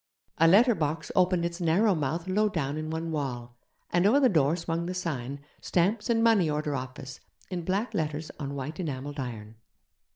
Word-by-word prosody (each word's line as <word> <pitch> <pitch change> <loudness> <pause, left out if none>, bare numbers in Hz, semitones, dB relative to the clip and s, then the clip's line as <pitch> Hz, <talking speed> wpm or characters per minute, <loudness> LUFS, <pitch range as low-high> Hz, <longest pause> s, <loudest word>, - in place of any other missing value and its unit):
A 165 - +6
letter 230 +8 +6
box 155 -3 -2
opened 180 -2 +3
its 170 +1 -4
narrow 190 +6 +3
mouth 160 +2 -2
low 210 +3 +2
down 145 -7 -2
in 155 0 -4
one 160 +1 -3
wall, 120 -5 -4 0.4
and 175 +3 +3
over 260 +7 +5
the 265 -3 +5
door 155 -5 +3
swung 165 0 -3
the 180 - -4
sign, 140 -7 -3 0.2
'Stamps 205 +7 0
and 225 -1 +3
money 215 -8 +4
order 150 0 -1
office', 130 0 -7 0.3
in 180 -1 -2
black 195 +7 -1
letters 155 0 -2
on 140 -2 -4
white 140 +4 -5
enamelled 145 -3 -4
iron. 110 -4 -6
165 Hz, 185 wpm, -28 LUFS, 140-185 Hz, 0.4 s, A